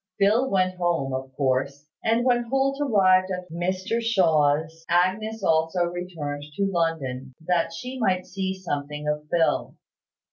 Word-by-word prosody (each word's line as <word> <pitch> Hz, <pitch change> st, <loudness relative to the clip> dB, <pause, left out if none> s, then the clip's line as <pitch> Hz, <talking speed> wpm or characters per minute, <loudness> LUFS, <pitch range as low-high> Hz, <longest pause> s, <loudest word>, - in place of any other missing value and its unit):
Phil 220 Hz, +6 st, +3 dB
went 185 Hz, -1 st, +1 dB
home, 170 Hz, -7 st, 0 dB
of 130 Hz, 0 st, -4 dB
course; 140 Hz, +1 st, 0 dB, 0.2 s
and 230 Hz, +2 st, +2 dB
when 240 Hz, -1 st, +2 dB
Holt 270 Hz, +3 st, 0 dB
arrived 190 Hz, -8 st, +4 dB
at 180 Hz, -2 st, -5 dB
Mr 185 Hz, +6 st, -1 dB
Shaw's, 160 Hz, -7 st, +2 dB
Agnes 200 Hz, +5 st, +1 dB
also 160 Hz, +1 st, +2 dB
returned 170 Hz, -5 st, -4 dB
to 200 Hz, -, +1 dB
London, 145 Hz, -8 st, -2 dB
that 170 Hz, -1 st, +1 dB
she 250 Hz, +10 st, -6 dB
might 185 Hz, -5 st, +1 dB
see 190 Hz, 0 st, -3 dB
something 150 Hz, -5 st, -4 dB
of 150 Hz, 0 st, -2 dB
Phil. 165 Hz, -1 st, +1 dB
180 Hz, 140 wpm, -25 LUFS, 150-195 Hz, 0.2 s, arrived